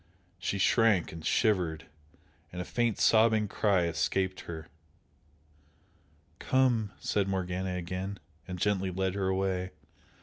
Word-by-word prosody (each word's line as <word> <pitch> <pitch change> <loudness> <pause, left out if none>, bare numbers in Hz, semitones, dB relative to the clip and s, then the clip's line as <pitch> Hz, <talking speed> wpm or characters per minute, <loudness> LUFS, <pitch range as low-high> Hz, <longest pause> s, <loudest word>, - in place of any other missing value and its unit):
She 100 - -2
shrank 105 -2 +3
and 80 0 -9
shivered, 85 -8 +1 0.7
and 90 - -7
a 90 - -3
faint 120 -3 0
sobbing 110 -1 +4
cry 100 -3 +2
escaped 90 +4 0
her. 80 -2 -8 1.7
"Come!" 120 -6 +2
said 100 -2 0
Morgana 95 -1 -2
again, 90 +3 -4 0.3
and 90 -1 -5
gently 95 0 0
led 95 0 -1
her 100 -1 -1
away. 95 -1 0
95 Hz, 115 wpm, -30 LUFS, 90-105 Hz, 1.7 s, sobbing